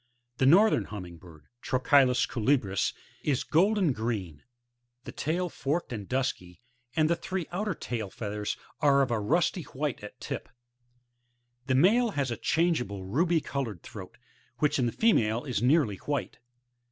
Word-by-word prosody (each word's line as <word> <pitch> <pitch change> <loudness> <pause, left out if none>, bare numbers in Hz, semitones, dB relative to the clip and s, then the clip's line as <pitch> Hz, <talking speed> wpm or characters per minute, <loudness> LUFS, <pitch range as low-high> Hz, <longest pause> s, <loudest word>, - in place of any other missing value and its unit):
The 130 - +3
Northern 205 +9 +5
Hum 105 -3 -7
ming 85 -1 -11
bird, 80 -4 -16
— 120 - -54
Trochilus 130 0 +3
colubris, 115 -5 +1 0.2
— - - -30
is 130 - -1
golden 185 -1 +3
green; 105 -10 -4 0.6
the - - -8
tail 175 +5 -1
forked 155 -2 -2
and 105 -4 -6
dusky, 125 -9 -2 0.4
and 155 -1 +3
the 170 - +2
three 190 -1 -4
outer 190 +1 -2
tail 115 -8 -4
feathers 105 0 -4 0.2
are 140 -1 +4
of 130 - -2
a 115 - +1
rusty 170 - +1
white 145 -5 -4
at 105 - -10
tip. - - -5 1.2
The 130 - +2
male 225 - +4
has 135 -3 0
a 120 - -3
changeable 140 - 0
ruby 165 - +1
coloured 120 - -4
throat, - - -10 0.4
which 150 -2 +1
in 125 - +2
the - - -1
female 115 - +2
is 125 -7 -2
nearly 125 - +3
white. 145 +1 -4
130 Hz, 160 wpm, -28 LUFS, 110-165 Hz, 1.2 s, Northern